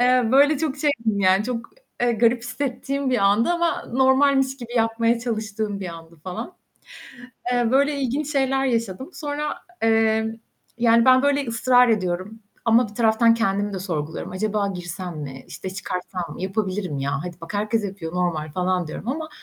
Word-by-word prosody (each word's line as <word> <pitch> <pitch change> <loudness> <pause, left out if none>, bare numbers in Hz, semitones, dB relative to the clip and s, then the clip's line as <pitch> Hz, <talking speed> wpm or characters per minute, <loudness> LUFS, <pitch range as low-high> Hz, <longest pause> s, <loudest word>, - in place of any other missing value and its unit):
Eee, 250 +1 +4
böyle, 285 +2 +5
çok 300 -3 -1
şeydim 235 -8 0
yani, 190 +1 +4
çok, 235 -1 -4 0.3
eee, 240 -1 +3
garip 235 +1 +2
hissettiğim 270 +2 -2
bir 250 - +2
andı 200 +5 +3
ama 345 -1 0
normalmiş 265 +1 +3
gibi 240 -3 -9
yapmaya 230 +1 +2
çalıştığım 220 -3 -3
bir 185 - -4
andı 165 0 -11
falan. 190 - -6 1.0
Eee, 245 -1 +2
böyle 280 +2 +3
ilginç 275 +3 -1
şeyler 270 -1 +1
yaşadım. 230 - -2
Sonra, 295 -1 -3 0.2
emm, 225 0 +2 0.5
yani, 230 0 +5
ben, 255 0 +6
böyle, 285 -1 +2
ısrar 245 +2 +4
ediyorum 195 0 -1 0.2
ama 230 0 +4
bir 210 - -14
taraftan 230 0 +4
kendimi 205 -2 0
de 190 - -3
sorguluyorum. 160 -4 -4
Acaba 210 +1 0
girsem 175 -1 -6
mi, 135 -3 -7
işte 190 - -7
çıkarsam 185 -1 -4
mı, - - -8
yapabilirim 190 -4 -2
ya, 140 +1 -1
hadi 175 -1 -6
bak 165 +5 -8
herkes 215 +1 0
yapıyor, 190 -5 -5
normal 165 -4 -1
falan 180 0 0
diyorum 155 +8 -7
ama 310 +4 -3
225 Hz, 165 wpm, -23 LUFS, 190-255 Hz, 1.0 s, ben